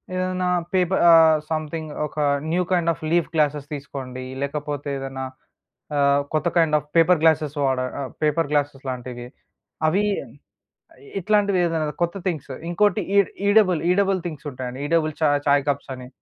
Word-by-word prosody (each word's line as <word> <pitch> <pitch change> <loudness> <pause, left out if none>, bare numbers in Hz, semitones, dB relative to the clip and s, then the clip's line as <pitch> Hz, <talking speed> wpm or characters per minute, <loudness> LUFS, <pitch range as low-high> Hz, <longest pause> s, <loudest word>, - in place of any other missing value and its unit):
ఏదన్నా 185 0 -1 0.3
పేప 180 -2 +2 0.2
ఆహ్, 160 -1 +7
సంథింగ్ 155 0 -3 0.2
ఒక - - -19 0.3
new 180 +2 +2
kind 175 -2 +2
of 165 +1 -6
leaf 170 -1 +2
glasses 150 -2 0
తీసుకోండి, 130 -2 -7 0.2
లేకపోతే 145 0 -3
ఏదన్నా 135 0 -5 0.7
ఆహ్, 140 0 +3
కొత్త 155 +2 +1
కైండ్ 160 -2 +3
ఆఫ్ 150 - -4
పేపర్ 165 +1 +5
గ్లాసెస్ 155 -2 +3
వాడ 130 -1 +1 0.2
ఆహ్, 135 - -5
పేపర్ 155 0 +1
గ్లాసెస్ 145 -2 -1
లాంటివి. 125 -1 -6 0.6
అవి 190 +6 +2 1.2
ఇట్లాంటివి 200 0 +2
ఏదన్నా 160 -2 -1
కొత్త 170 +3 -2
థింగ్సు, 155 -6 -3 0.2
ఇంకోటి 205 +2 +2 0.2
ఈ - - +9 0.3
ఈడబుల్ 205 -5 +4
ఈడబుల్ 195 0 +2
థింగ్స్ 155 -3 -8
ఉంటాయండి. 125 0 -6
ఈడబుల్ 160 -1 +1
చా 155 - +4 0.2
చాయ్ 140 0 +4
కప్సని, 130 -2 -4
155 Hz, 145 wpm, -23 LUFS, 140-175 Hz, 1.2 s, ఈ